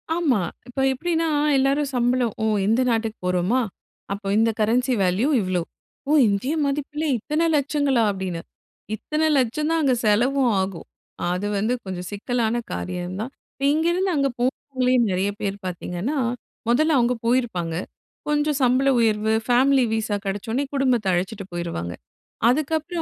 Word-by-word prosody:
ஆமா. 290 Hz, -, +2 dB, 0.3 s
இப்ப 250 Hz, +2 st, -6 dB
எப்படின்னா 330 Hz, +3 st, -1 dB, 0.3 s
எல்லாரும் 275 Hz, +1 st, +2 dB
சம்பளோ 245 Hz, 0 st, +2 dB, 0.2 s
ஓ! -, -, +2 dB, 0.2 s
இந்த 230 Hz, +4 st, +3 dB
நாட்டுக்கு 225 Hz, -1 st, -1 dB
போறோமா! 180 Hz, +7 st, +1 dB, 0.5 s
அப்ப 200 Hz, 0 st, -4 dB
இந்த 225 Hz, 0 st, +3 dB
கரன்சி 245 Hz, +4 st, +2 dB
வேல்யூ 185 Hz, +9 st, +2 dB
இவ்வளோ. 185 Hz, -2 st, 0 dB, 0.5 s
ஓ! -, -, +2 dB, 0.2 s
இந்திய 210 Hz, +10 st, 0 dB
மதிப்பில 295 Hz, +2 st, -2 dB
இத்தனை 305 Hz, +9 st, -1 dB
லட்சங்களா! 280 Hz, -4 st, +1 dB
அப்படின்னு, 185 Hz, -3 st, -4 dB, 0.5 s
இத்தனை 305 Hz, +7 st, -1 dB
லட்சம் 265 Hz, +5 st, 0 dB
தான் 330 Hz, -1 st, +2 dB
அங்க 260 Hz, -3 st, +3 dB
செலவும் 245 Hz, +4 st, +3 dB
ஆகும். 190 Hz, -3 st, -5 dB, 0.4 s
அது 180 Hz, +3 st, -2 dB
வந்து 220 Hz, +5 st, +1 dB
கொஞ்சம் 180 Hz, -1 st, -5 dB
சிக்கலான 230 Hz, +2 st, -1 dB, 0.2 s
காரியம் 175 Hz, -, -4 dB
தான். 255 Hz, +4 st, -5 dB, 0.2 s
இப்ப 275 Hz, -, -9 dB
இங்கிருந்து 345 Hz, +4 st, +1 dB
அங்கே 275 Hz, -1 st, +2 dB
போனவங்களே 255 Hz, 0 st, 0 dB, 0.2 s
நெறைய 190 Hz, +2 st, 0 dB
பேர் 200 Hz, -1 st, -2 dB
பார்த்தீங்கன்னா, 180 Hz, -, -3 dB, 0.5 s
மொதல்ல 310 Hz, +5 st, +3 dB
அவங்க 240 Hz, +1 st, +2 dB
போயிருப்பாங்க. 225 Hz, -10 st, 0 dB, 0.5 s
கொஞ்சம் 295 Hz, -1 st, +1 dB
சம்பள 255 Hz, +2 st, +3 dB
உயர்வு, 220 Hz, -1 st, +2 dB
ஃபேமிலி 260 Hz, +2 st, +4 dB
வீசா 220 Hz, -2 st, -1 dB
கிடைச்ச 195 Hz, +3 st, -3 dB
உடனே 275 Hz, +4 st, 0 dB
குடும்பத்த 255 Hz, -6 st, +2 dB
அழைச்சுட்டு 190 Hz, +3 st, -2 dB
போயிருவாங்க. 165 Hz, -, -4 dB, 0.6 s
அதுக்கப்புறம் 315 Hz, +5 st, 0 dB
245 Hz, 140 wpm, -23 LUFS, 200-275 Hz, 0.6 s, ஃபேமிலி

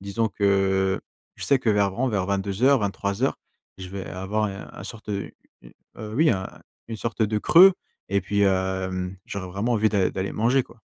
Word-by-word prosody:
Disons 100 Hz, +3 st, -1 dB
que, 95 Hz, -2 st, +1 dB, 0.4 s
je -, -, -5 dB
sais 140 Hz, -, +3 dB
que 125 Hz, -, -2 dB
vers 100 Hz, -1 st, +2 dB
vren 120 Hz, +7 st, -1 dB
vers 100 Hz, -5 st, -1 dB
22:00-23:00, 100 Hz, +2 st, +1 dB, 0.4 s
je 95 Hz, -, -7 dB
vais 95 Hz, 0 st, -6 dB
avoir 95 Hz, +4 st, -2 dB
un 100 Hz, -1 st, -5 dB
un -, -, -9 dB
sorte 110 Hz, -2 st, -8 dB
de 100 Hz, -1 st, -4 dB, 0.3 s
u -, -, -13 dB, 0.3 s
heu, 110 Hz, 0 st, -7 dB
oui 155 Hz, +5 st, +4 dB
un 95 Hz, -2 st, -1 dB, 0.4 s
une 115 Hz, -, -4 dB
sorte 115 Hz, +1 st, -2 dB
de 105 Hz, 0 st, +1 dB
creux 185 Hz, -, +7 dB, 0.4 s
et 100 Hz, 0 st, +1 dB
puis, 100 Hz, +2 st, -1 dB
hem, 95 Hz, -1 st, 0 dB
j'aurais 95 Hz, -2 st, -5 dB
vraiment 100 Hz, +7 st, -2 dB
envie 110 Hz, -1 st, +3 dB
d'a 100 Hz, -3 st, +1 dB
d'aller 95 Hz, +1 st, -3 dB
manger 125 Hz, +5 st, +2 dB
quoi. 115 Hz, -1 st, -19 dB
100 Hz, 185 wpm, -24 LUFS, 95-115 Hz, 0.4 s, creux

